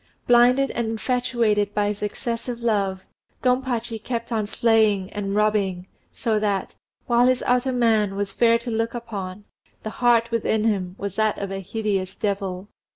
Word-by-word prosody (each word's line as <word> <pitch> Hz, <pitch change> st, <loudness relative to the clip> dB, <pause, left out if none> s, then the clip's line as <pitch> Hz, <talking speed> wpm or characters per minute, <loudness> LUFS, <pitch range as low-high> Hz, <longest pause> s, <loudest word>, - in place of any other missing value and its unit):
Blinded 245 Hz, +3 st, +4 dB
and 235 Hz, -1 st, -2 dB
infatuated 225 Hz, -3 st, 0 dB
by 205 Hz, 0 st, +2 dB
his 205 Hz, -1 st, -5 dB
excessive 235 Hz, +3 st, -4 dB
love, 195 Hz, -4 st, 0 dB, 0.4 s
Gompachi 250 Hz, -3 st, 0 dB
kept 235 Hz, -1 st, -4 dB
on 215 Hz, -3 st, 0 dB
slaying 215 Hz, -4 st, +2 dB
and 200 Hz, -1 st, -3 dB
robbing, 205 Hz, -4 st, +1 dB, 0.3 s
so 220 Hz, -3 st, 0 dB
that, 200 Hz, -2 st, -1 dB, 0.3 s
while 240 Hz, +1 st, +4 dB
his 255 Hz, -1 st, +2 dB
outer 250 Hz, +1 st, +2 dB
man 220 Hz, -5 st, +2 dB
was 200 Hz, 0 st, -3 dB
fair 230 Hz, -1 st, +4 dB
to 235 Hz, +1 st, -6 dB
look 225 Hz, +1 st, -1 dB
upon, 205 Hz, -5 st, -6 dB, 0.4 s
the 215 Hz, -, -4 dB
heart 235 Hz, -1 st, +4 dB
within 220 Hz, -1 st, +1 dB
him 190 Hz, -5 st, 0 dB
was 200 Hz, -1 st, -5 dB
that 215 Hz, -1 st, +2 dB
of 200 Hz, -1 st, -4 dB
a 195 Hz, -, -3 dB
hideous 195 Hz, -1 st, -2 dB
devil. 195 Hz, -3 st, -3 dB
220 Hz, 155 wpm, -23 LUFS, 200-235 Hz, 0.4 s, Blinded